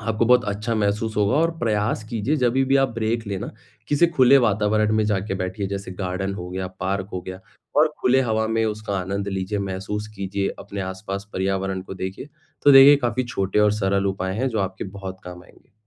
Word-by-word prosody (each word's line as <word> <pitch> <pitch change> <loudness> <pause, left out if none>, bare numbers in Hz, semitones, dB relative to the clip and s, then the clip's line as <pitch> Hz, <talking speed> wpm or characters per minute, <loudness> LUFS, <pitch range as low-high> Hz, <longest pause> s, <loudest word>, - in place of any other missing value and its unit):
आपको 110 +1 0
बहुत 125 0 +5
अच्छा 105 +3 -2
महसूस 105 +1 -1
होगा 100 -1 +2
और 165 +2 +3
प्रयास 110 -2 0
कीजिए 120 +6 0
जभी 130 0 +2
भी 135 +1 +3
आप 135 0 +3
ब्रेक 115 0 -1
लें 100 -1 -2
ना, - - -5 0.4
किसी 150 +4 +4
खुले 140 -5 +5
वातावरण 110 -2 +2
में 110 - +2
जाके 100 -1 -1
बैठिए 95 +1 -3
जैसे 100 -1 -5
गार्डन 95 +1 -2
हो 90 -2 -6
गया, 95 0 -3
पार्क 95 +1 -2
हो 90 - -2
गया, 95 +1 -8 0.4
और 155 +2 +5
खुले 130 +1 +4
हवा 110 -2 0
में 115 0 +1
उसका 105 -2 -3
आनंद 100 +2 -3
लीजिए, 95 +1 -2
महसूस 100 +2 -4
कीजिए 100 0 -2
अपने 100 +1 -6
आस-पास 95 +2 -6
पर्यावरण 95 0 -1
को 95 - -8
देखिए। 95 +8 -6 0.4
तो 145 - +8
देखिए 135 +2 +9
काफ़ी 125 +2 -1
छोटे 100 -4 -1
और 105 0 +4
सरल 100 -1 0
उपाय 95 -1 -2
हैं, 130 +4 0
जो 115 -3 -2
आपके 95 -1 -3
बहुत 95 -1 -7
काम 90 0 -9
आएँगे। - - -23
105 Hz, 205 wpm, -23 LUFS, 95-115 Hz, 0.4 s, देखिए